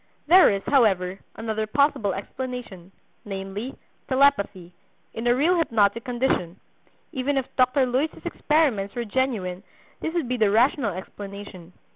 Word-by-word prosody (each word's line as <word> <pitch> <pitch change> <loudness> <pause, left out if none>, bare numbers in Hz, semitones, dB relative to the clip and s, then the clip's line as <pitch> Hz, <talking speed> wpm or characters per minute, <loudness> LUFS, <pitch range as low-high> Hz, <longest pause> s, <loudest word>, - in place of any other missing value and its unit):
There 360 +4 +7
is, 195 -1 -1
however, 195 -8 +2 0.2
another 220 -1 -3
possible 225 -4 +2
explanation, 205 -4 -7 0.3
namely, 200 +5 -6 0.3
telepathy, 205 -10 +2 0.4
in 225 +2 -3
a 240 - +4
real 320 +8 +3
hypnotic 225 -6 +2
condition. 240 -8 -1 0.5
Even 275 -1 -1
if 265 - 0
Dr. 255 +1 +3
Luys's 260 +5 -2
experiments 270 -11 +1
were 240 -1 -2
genuine 210 -7 -1 0.4
this 320 - -4
would 330 -7 0
be 250 +1 -1
the 215 -3 +3
rational 230 - +2
explanation. 195 -2 -9
230 Hz, 130 wpm, -24 LUFS, 195-265 Hz, 0.5 s, There